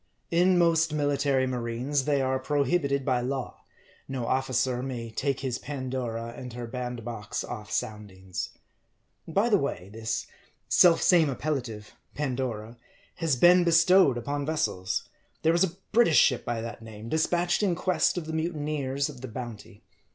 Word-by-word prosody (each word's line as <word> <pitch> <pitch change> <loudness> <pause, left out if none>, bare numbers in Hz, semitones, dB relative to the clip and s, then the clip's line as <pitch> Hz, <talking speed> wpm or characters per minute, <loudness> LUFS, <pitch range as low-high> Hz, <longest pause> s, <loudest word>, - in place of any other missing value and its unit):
In 180 +2 +4
most 165 -2 +3
military 145 -2 +1
marines, 125 +3 -1
they 140 -2 +2
are 130 0 0
prohibited 140 0 0
by 125 -2 +1
law; 130 +1 -4 0.5
no 130 -3 -3
officer 130 -1 0
may 120 -3 -5
take 135 +4 -1
his 130 -2 -2
Pandora 125 -4 -4
and 125 -1 -8
her 120 0 -5
bandbox 120 -3 -5
ofF 105 -2 -7
soundings. 100 -6 -4 0.8
By 200 +8 +2
the 210 -4 +4
way, 100 -9 -4
this 110 0 -3 0.4
self 170 -2 +5
same 170 -5 +5
appellative, 125 -7 -4 0.2
Pandora, 125 -5 -3 0.4
has 165 -5 +1
been 175 +7 +6
bestowed 170 -4 +5
upon 140 +4 -3
vessels. 140 -11 -1 0.4
There 160 - +4
was 170 +2 +4
a 185 -1 -2
British 225 -9 +5
ship 125 - +4
by 120 -1 -2
that 115 0 -7
name, 110 -1 -10
dispatched 175 - +1
in 190 -4 +2
quest 185 +1 +1
of 170 - -3
the 160 - -5
mutineers 150 -4 -1
of 135 -5 -10
the 130 - -5
Bounty. 115 -4 -8
130 Hz, 150 wpm, -27 LUFS, 120-160 Hz, 0.8 s, been